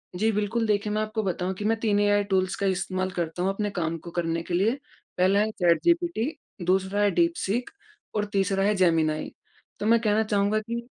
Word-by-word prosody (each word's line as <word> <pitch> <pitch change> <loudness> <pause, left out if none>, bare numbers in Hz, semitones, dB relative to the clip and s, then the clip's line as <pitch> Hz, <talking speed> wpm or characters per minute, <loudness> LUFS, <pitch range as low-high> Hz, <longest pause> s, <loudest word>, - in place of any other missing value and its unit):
जी 220 +4 +2
बिल्कुल 210 +2 0
देखिए 210 0 0
मैं 215 - 0
आपको 215 0 -2
बताऊँ 185 0 -2
कि 205 +2 -6
मैं 225 +1 +2
3 210 -3 +1
एआई 205 0 +3
टूल्स 190 -2 0
का 200 - -2
इस्तेमाल 185 0 -1
करता 175 -1 -3
हूँ 190 - +2
अपने 205 +1 -2
काम 165 -3 -2
को 170 +2 -10
करने 165 -1 -1
के 175 - -6
लिए, 200 +6 +3 0.5
पहला 190 +3 +3
है 215 +1 +1
चैट 175 -4 +2
जीपीटी 340 -5 +1 0.3
दूसरा 190 +2 +1
है 205 - +3
दीप 335 - +2
सिख 235 +6 -2 0.4
और 210 - +1
तीसरा 195 0 +1
है 210 +1 +2
जेमिनी। 160 -4 +1 0.5
तो 205 - -3
मैं 230 +1 +5
कहना 215 0 +2
चाहूँगा 210 0 +1
कि 235 +2 -5
205 Hz, 210 wpm, -26 LUFS, 185-215 Hz, 0.5 s, मैं